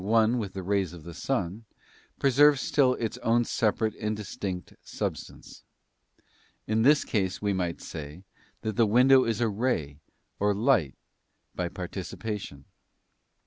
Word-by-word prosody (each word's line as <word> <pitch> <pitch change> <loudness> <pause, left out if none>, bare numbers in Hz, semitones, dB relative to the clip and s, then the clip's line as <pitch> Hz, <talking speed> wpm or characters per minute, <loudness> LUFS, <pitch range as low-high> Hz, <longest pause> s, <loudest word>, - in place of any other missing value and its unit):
one 115 +3 +3
with 100 -4 -4
the 95 - -5
rays 95 -2 0
of 85 -3 -11
the 85 +1 -9
sun, 100 -1 -2 0.5
preserves 140 +1 +5
still 130 -2 +2
its 115 -2 -4
own 120 +1 +2
separate 110 -1 0
and 105 0 -2
distinct 95 -3 -5
substance. - - -6 1.0
In 110 +1 +1
this 145 +5 +5
case 95 -5 -1
we 100 -1 0
might 90 -3 -2
say 75 +4 -8 0.4
that 110 -2 -3
the 115 - +4
window 130 +4 +5
isa 115 +1 +1
ray 100 - -1 0.4
or 105 0 +2
light 105 - +2 0.6
by - - -2
participation. 100 -11 -6
105 Hz, 135 wpm, -27 LUFS, 95-120 Hz, 1.0 s, preserves